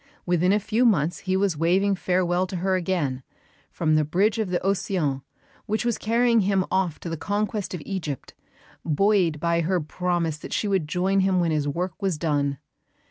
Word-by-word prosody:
Within 180 +1 +2
a 205 - +3
few 220 +4 0
months 175 - +2
he 190 -1 -1
was 195 -3 +1
waving 185 +6 +2
farewell 180 -1 0
to 185 - -6
her 185 +2 0
again, 165 -8 -1 0.5
from 155 -2 0
the 155 0 +4
bridge 195 +9 +1
of 215 -4 -1
the 180 - 0
Océan 180 -7 0 0.5
which 215 +3 -1
was 235 -2 0
carrying 235 +1 +3
him 195 -2 +2
off 185 -4 0
to - - -6
the 165 - -3
conquest 205 +2 -2
of 160 - -7
Egypt, 160 -9 -5 0.5
buoyed 175 -1 +2
by 170 +1 +1
her 180 +2 +1
promise 170 0 -2
that - - -7
she 210 - 0
would 190 -6 0
join 185 +5 +1
him 190 -1 +2
when 170 -2 +1
his 150 -2 0
work 175 +5 -3
was 190 -5 0
done. 145 -3 0
180 Hz, 190 wpm, -25 LUFS, 160-195 Hz, 0.5 s, the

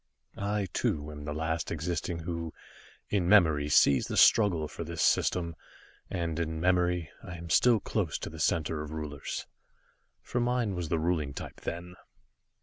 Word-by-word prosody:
I, 100 0 -1
too, 75 0 -1
am 75 -1 -8
the 75 - -3
last 80 +1 -2
existing 85 +1 -3
who, 85 -1 -4 0.6
in 95 -4 +1
memory, 80 -8 +5
sees 70 -2 +5
the - - -3
struggle 90 -8 +5
for 85 - -6
this 85 -3 -2
System, 85 +3 +2 0.5
and 85 -2 -2
in 80 -1 -2
memory 90 -2 +1
I 90 - -8
am 85 0 -8
still 120 -3 +5
close - - -1
to - - -6
the - - -9
Center 80 -1 0
of 75 - -6
Rulers, 75 -2 -5 0.8
for 120 - -2
mine 120 -3 +1
was 90 -3 -3
the 85 - +1
ruling 80 -4 -1
type - - -8
then. 85 +1 -5
85 Hz, 160 wpm, -30 LUFS, 75-90 Hz, 0.8 s, memory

